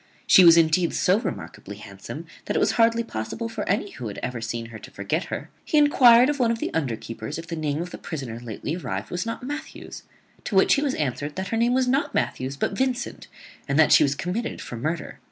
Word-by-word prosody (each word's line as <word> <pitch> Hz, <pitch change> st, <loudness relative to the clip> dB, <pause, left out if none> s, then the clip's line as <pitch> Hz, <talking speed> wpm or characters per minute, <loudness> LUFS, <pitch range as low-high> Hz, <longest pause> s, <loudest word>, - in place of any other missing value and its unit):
She 190 Hz, -, +7 dB
was 170 Hz, -1 st, +8 dB
indeed 165 Hz, +1 st, +3 dB
so 190 Hz, +4 st, +3 dB
remarkably -, -, -6 dB
handsome, -, -, -9 dB, 0.2 s
that -, -, -2 dB
it -, -, +3 dB
was -, -, +3 dB
hardly 230 Hz, 0 st, +3 dB
possible 170 Hz, -, -5 dB
for 225 Hz, -2 st, -5 dB
any 200 Hz, +1 st, 0 dB
who 120 Hz, -, -7 dB
had 100 Hz, -, -7 dB
ever 125 Hz, -2 st, -3 dB
seen 115 Hz, 0 st, -4 dB
her 110 Hz, -, -8 dB
to -, -, -11 dB
forget 150 Hz, -, -2 dB
her. -, -, -6 dB
He 305 Hz, -, 0 dB
enquired 255 Hz, -5 st, +7 dB
of 290 Hz, -1 st, -1 dB
one 240 Hz, -2 st, +3 dB
of 230 Hz, -, 0 dB
the -, -, -3 dB
underkeepers 115 Hz, -6 st, -4 dB
if 165 Hz, -, -7 dB
the 165 Hz, 0 st, -5 dB
name 155 Hz, 0 st, -2 dB
of 180 Hz, -, -9 dB
the -, -, -8 dB
prisoner 130 Hz, -8 st, -6 dB
lately 120 Hz, +6 st, -5 dB
arrived 175 Hz, -, -5 dB
was 180 Hz, +5 st, -3 dB
not 230 Hz, -, -5 dB
Matthews; 290 Hz, +4 st, -7 dB, 0.4 s
to 205 Hz, -, -3 dB
which 190 Hz, -, +5 dB
he 280 Hz, -, +2 dB
was 285 Hz, -3 st, 0 dB
answered 145 Hz, +1 st, -3 dB
that 190 Hz, +1 st, -4 dB
her 225 Hz, -, -1 dB
name 240 Hz, +2 st, +2 dB
was 260 Hz, -1 st, +2 dB
not 270 Hz, +3 st, 0 dB
Matthews 130 Hz, +2 st, -2 dB
but 195 Hz, -, -1 dB
Vincent, 260 Hz, +2 st, -2 dB, 0.4 s
and 140 Hz, 0 st, 0 dB
that 160 Hz, -1 st, +5 dB
she -, -, +7 dB
was 140 Hz, 0 st, +2 dB
committed 185 Hz, +10 st, -3 dB
for -, -, -7 dB
murder. 155 Hz, +7 st, -4 dB
175 Hz, 230 wpm, -24 LUFS, 135-230 Hz, 0.4 s, was